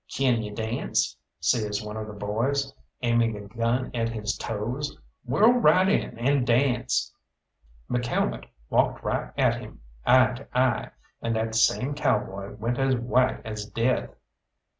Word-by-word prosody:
"Kin 125 -4 +1
you 105 -1 -5
dance?" 110 +2 -1 0.2
says 105 +3 0
one 105 0 -6
of 110 -1 -5
the 105 - -8
boys, 115 +7 -1 0.3
aiming 115 -2 +2
a - - -7
gun 115 +4 -1
at 115 -1 0
his 105 -2 -2
toes. 120 +7 -4 0.3
"Whirl 210 - +5
right 190 -5 +5
in 195 - 0
and 130 +2 +1
dance!" 125 0 +1 0.7
McCalmont 120 -1 -1 0.3
walked - - +2
right - - -2
at - - +2
him, - - -11 0.2
eye 130 0 +5
to 125 0 -7
eye, 125 -2 +2 0.3
and 115 0 -1
that 110 0 -1
same 115 +5 +2
cowboy 105 -9 -1
went 115 +4 -2
as 135 -1 +3
white 125 +1 +1
as 110 -2 -5
death. 115 +3 0
115 Hz, 145 wpm, -26 LUFS, 110-130 Hz, 0.7 s, Whirl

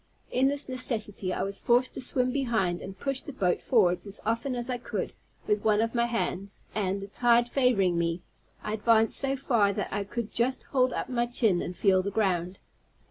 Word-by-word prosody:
In 260 +2 +3
this 285 +1 -2
necessity, 220 -7 -3
I 185 - -1
was 195 +1 -3
forced 245 +2 +3
to - - -5
swim 255 0 +1
behind, 225 -10 0
and 190 0 -8
push 275 -1 -1
the - - -8
boat 185 -9 0
forwards 180 -6 +2
as 200 - -7
often 230 +4 -1
as 240 0 -3
I 250 -1 -2
could, 230 -5 -4 0.3
with 210 -1 0
one 215 -1 +3
of 225 +1 0
my 235 -1 +2
hands; 200 -4 -2
and, 200 -2 -1
the 195 - -7
tide 240 +3 +3
favoring 210 -10 +2
me, 170 +1 -1 0.4
I 210 - -3
advanced 225 0 +3
so 270 0 0
far, 230 -6 +2
that 205 -2 -3
I 205 0 -1
could 215 +2 -5
just 255 +3 0
hold 255 -2 +1
up - - -3
my 240 -1 0
chin 225 -7 +2
and 180 - -5
feel 190 -1 +4
the 195 - -2
ground. 185 -3 0
220 Hz, 205 wpm, -28 LUFS, 195-250 Hz, 0.4 s, feel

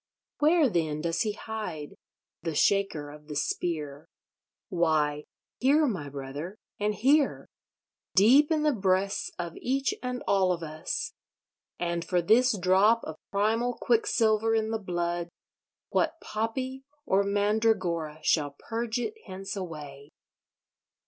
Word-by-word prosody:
Where, 310 0 +5
then, 160 -7 -1
does 165 0 0
he 215 -2 0
hide, 205 -9 -6 0.5
the 165 -3 -3
Shaker 180 -5 +1
of 150 0 -14
the 150 - -6
Spear? 150 -1 -2 0.6
Why, 155 -5 +1 0.3
here, 290 +4 +4
my 180 - -2
brother, 140 +6 -6 0.2
and 210 0 0
here; 280 +5 +3 0.7
deep 265 - +6
in 310 -1 +2
the 300 -1 +3
breasts 195 -2 +1
of 170 -1 -5
each 270 +2 0
and 250 0 -4
all 190 -2 +3
of 170 -1 -5
us! 155 0 -4 0.6
And 170 -1 -2
for 180 0 +1
this 225 +6 +4
drop 195 +5 +4
of 160 0 -7
primal 225 +4 +1
quicksilver 225 -1 +2
in 220 0 0
the 225 - -1
blood 175 -2 -2 0.6
what 325 0 0
poppy 255 +5 -3 0.2
or 195 -5 +3
mandragora 200 -6 +1
shall 145 -3 +1
purge 230 0 -3
it 245 - -2
hence 195 +1 -6
away? 150 -6 -7
195 Hz, 130 wpm, -28 LUFS, 165-225 Hz, 0.7 s, deep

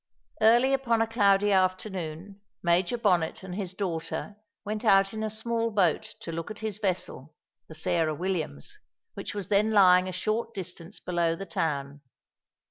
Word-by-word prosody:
Early 240 +5 +5
upon 235 -4 +2
a - - -3
cloudy 205 -2 +3
afternoon, 185 -1 -1 0.2
Major 175 +6 +2
Bonnet 180 -7 +1
and 190 -1 -7
his 185 -1 -4
daughter 185 +1 -4 0.3
went 215 +2 -3
out 195 -2 +4
in 220 - -4
a 220 - -1
small 230 +1 -1
boat 195 -7 +1
to 165 - -6
look 165 +2 -5
at 215 - -7
his 215 -2 -4
vessel, 175 -7 -3 0.3
the 160 - -11
Sarah 160 -1 0
Williams, 165 - -4 0.3
which - - -6
was 200 -3 -5
then 210 +2 +3
lying 185 -3 +6
a - - -3
short 220 +5 -2
distance 180 0 -7
below 170 -2 0
the 195 - -7
town. 145 -4 -3
190 Hz, 160 wpm, -28 LUFS, 170-215 Hz, 0.3 s, lying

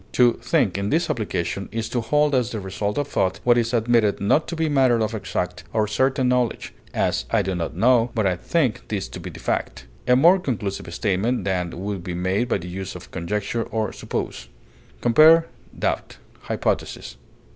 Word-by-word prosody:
To 120 -2 +4
think, - - +1
in 100 +1 -1
this 170 +3 +1
application, 100 -3 -3
is 115 0 -3
to 120 - -1
hold 150 +5 +2
as 125 -3 +2
the 110 - -4
result 100 +2 -3
of 145 -1 0
thought 95 - 0
what 120 -1 +5
is 115 -1 +1
admitted 115 -3 +2
not 105 +10 +2
to 170 - -4
be 160 -1 0
matter 130 -5 +3
of 110 0 -1
exact 110 - -3
or 110 -1 +2
certain 130 +4 +1
knowledge; 125 -1 0 0.2
as, - - 0
I - - +2
do 95 - -2
not 85 -2 -3
know, 120 0 +4
but 110 -3 +1
I 95 -2 +2
think 130 - -1
this 100 -3 -3
to - - -8
be - - -7
the - - -10
fact: 65 - -3 0.2
a 125 - +5
more 170 +8 +6
conclusive 105 - -3
statement 100 +6 0
than 90 -3 -2
would 100 -3 -4
be 90 -1 -4
made 95 +6 0
by - - +2
the 90 -2 -8
use 95 +1 -6
of 90 - -11
conjecture 105 +6 -2
or 110 -2 -2
suppose. 60 - -5 0.5
Compare 155 +7 +6 0.3
DOUBT; - - -2 0.3
HYPOTHESIS. - - -2
110 Hz, 190 wpm, -23 LUFS, 95-125 Hz, 0.5 s, more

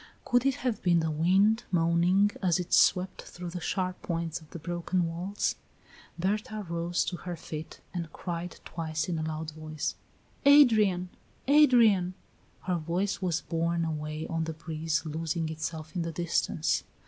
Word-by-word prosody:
Could 245 +1 +3
it 270 - +2
have 240 -4 0
been 175 -2 +4
the 160 -1 0
wind, 195 +9 +3
moaning 175 +3 +3
as 180 -4 +3
it 180 - -4
swept 185 +1 +4
through 175 -1 -8
the 180 - -4
sharp 185 +1 -2
points 165 -1 -3
of 155 - -17
the - - -7
broken 175 +2 -1
walls? 175 +5 -1 0.6
Berta 210 +3 -2
rose 170 +1 -1
to 175 - -3
her 175 -1 -5
feet, 155 -1 -8
and 170 -3 -4
cried 175 0 -5
twice 160 0 -3
in 170 -3 -1
a - - -1
loud 155 0 -4
voice: 155 0 -4 0.5
"Adrian! 215 -11 +6 0.4
Adrian!" 235 -11 +5 0.5
Her 180 -1 0
voice 175 +5 -1
was 175 -2 0
borne 170 0 0
away 155 0 -3
on 165 -1 -2
the 160 - -4
breeze, 160 0 -2
losing 160 +1 -2
itself 160 +1 -5
in 175 - 0
the 165 0 -2
distance. 170 +1 0
170 Hz, 160 wpm, -29 LUFS, 160-185 Hz, 0.6 s, Adrian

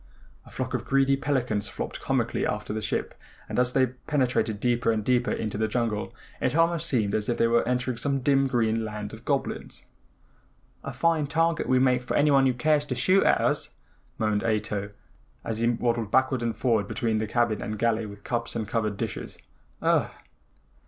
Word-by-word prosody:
A - - -12
flock - - -4
of - - -1
greedy 135 0 +3
pelicans 125 -7 -1
flopped - - -5
comically - - 0
after - - -2
the 110 - -3
ship 105 - -2 0.3
and - - -2
as 125 0 +3
they 130 -1 +4
penetrated 125 -4 -1
deeper 120 -1 +1
and 110 -2 -2
deeper 125 0 +2
into 105 -1 -3
the 110 - +1
jungle 110 -2 -1 0.3
it 130 - 0
almost 165 0 +2
seemed 110 -6 +1
as 105 +1 -1
if 120 - 0
they - - +3
were 115 0 +3
entering 125 -1 -1
some 140 +1 -1
dim 135 0 +3
green 115 -3 +1
land 105 -1 -5
of 110 +2 -11
goblins. 140 -2 -3 1.0
"A 140 - -5
fine 155 +3 +1
target 165 +2 +1
we 130 - +4
make 125 -1 +3
for 125 - -2
anyone 140 -2 +4
who 130 - +2
cares 150 +3 +2
to 130 - -3
shoot 185 +10 +3
at - - +4
us," - - -1 0.4
moaned 105 -1 0
Ato, 105 -2 -1 0.5
as 110 -1 -3
he 115 - +2
waddled 115 -2 0
backward 130 +1 +2
and 115 -1 -2
forward 110 -5 +1
between 110 0 -1
the 110 - -2
cabin 120 -1 +1
and 110 - -4
galley 115 0 +1
with 100 0 -11
cups 120 -1 -3
and 110 -2 -2
covered 105 -2 -1
dishes. - - -5 0.5
"Ugh!" - - +3
120 Hz, 190 wpm, -26 LUFS, 110-135 Hz, 1.0 s, they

